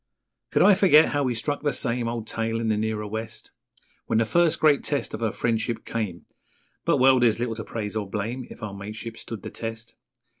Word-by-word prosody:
Could - - +3
I 205 - +8
forget 180 -5 +6
how 145 - 0
we 125 -3 0
struck 145 +6 -2
'the 145 -2 0
same 120 -1 0
Old 115 -1 -3
tale' 115 0 -2
in 115 -1 -1
the 110 - +2
nearer 110 0 -2
West, 110 +2 -6 0.6
When 115 - +1
the 115 - +3
first 170 +7 +2
great 150 -3 +4
test 145 -2 -1
of - - -5
our 110 -2 +1
friendship 115 0 -1
came 105 -7 -4 0.6
But - - +3
well, 130 0 +6
there's 120 -3 +3
little 120 -1 -2
to 110 0 -6
praise 105 -2 -5
or 105 -3 -3
blame 115 +6 -3
If - - -11
our 105 -2 -4
mateship 105 +3 -7
stood 115 -2 -8
the - - -6
test. 115 0 -6
115 Hz, 215 wpm, -25 LUFS, 110-125 Hz, 0.6 s, I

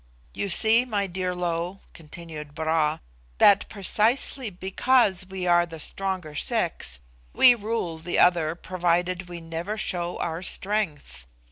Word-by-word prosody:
You 200 - -3
see, 220 +6 +4
my 210 -5 -1
dear 185 -1 -3
Lo," 175 +2 -3
continued 155 -2 -10
Bra, 160 -1 +1 0.4
"that 200 - +5
precisely 220 +5 0
because 190 +1 +2
we 190 -1 -5
are 175 -1 +4
the 165 -1 -9
stronger 185 -2 -3
sex, 65 - -1 0.3
we 250 - +7
rule 210 -7 -3
the 175 +2 -3
other 170 -3 +3
provided 180 +1 -1
we 175 -1 -7
never 165 +6 -5
show 175 -4 -2
our 165 +1 -3
strength. 170 - -2
180 Hz, 130 wpm, -25 LUFS, 165-200 Hz, 0.4 s, we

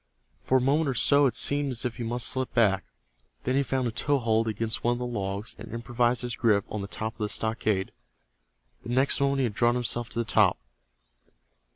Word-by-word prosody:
For 130 - +2
a - - +1
moment 140 +4 +2
or 130 - -2
so 140 +3 +4
it 120 - -3
seemed 145 -2 +2
as 125 +2 0
if 120 -1 -3
he 120 - -4
must 120 +1 0
slip 130 -1 -1
back. 100 -5 +3 0.6
Then 130 - 0
he 140 - +3
found 130 -2 -1
a - - -2
toe 145 +5 0
hold 115 -2 +1
against 110 +1 -1
one 120 - +2
of - - -4
the 125 - -4
logs, 100 -3 -4
and 110 +1 -9
improved 120 +1 0
his 120 -1 -3
grip 105 -4 +2
on 105 - -3
the 100 - -5
top 110 +2 -5
of - - -32
the 105 -1 -2
stockade. 110 -4 -1 0.9
The - - -10
next 130 +3 +2
moment 140 0 +1
he - - +1
had 115 -4 -1
drawn 120 +3 +2
himself 120 -1 -2
to - - -3
the 115 - 0
top. - - +3
120 Hz, 225 wpm, -27 LUFS, 110-130 Hz, 0.9 s, so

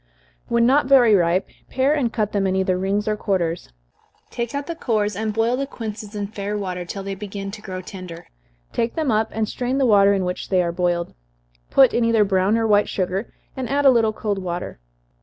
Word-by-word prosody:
When 235 0 +2
not 265 +2 +3
very 255 -5 +6
ripe, 180 0 +2 0.2
pare 265 +3 +2
and 265 -6 0
cut 215 -3 -1
them 195 -2 0
either 190 0 +1
in 180 - -2
rings 200 +2 -1
or 215 - +1
quarters, 175 -5 -2 0.6
take 235 +2 -4
out 285 0 -3
the 335 - -4
cores, 215 - -1
and 215 +2 -2
boil 225 +3 +1
the 275 +1 -3
quinces 215 -4 -7
in 205 -1 -2
fair 205 0 -4
water, 180 -3 -4
till 195 +3 -6
they 195 0 -4
begin 195 0 -6
to 210 - -9
grow 185 -3 -6
tender 180 -2 -9 0.5
take 230 0 -1
them 310 -6 0
up, 220 0 +1
and 220 -1 -1
strain 250 +4 -2
the 275 - +2
water 200 -3 +5
in 190 -2 -1
which 180 0 -4
they 185 -2 +3
are 170 - -1
boiled 175 -1 -1 0.6
put 265 -3 +5
in 235 - +2
either 230 -2 +4
brown 195 +2 +2
or 225 - +1
white 210 -1 +3
sugar 190 +3 -2 0.2
add 275 +2 -1
a 270 - +8
little 225 -3 +3
cold 210 -2 -3
water. 175 - -5
210 Hz, 215 wpm, -22 LUFS, 190-235 Hz, 0.6 s, a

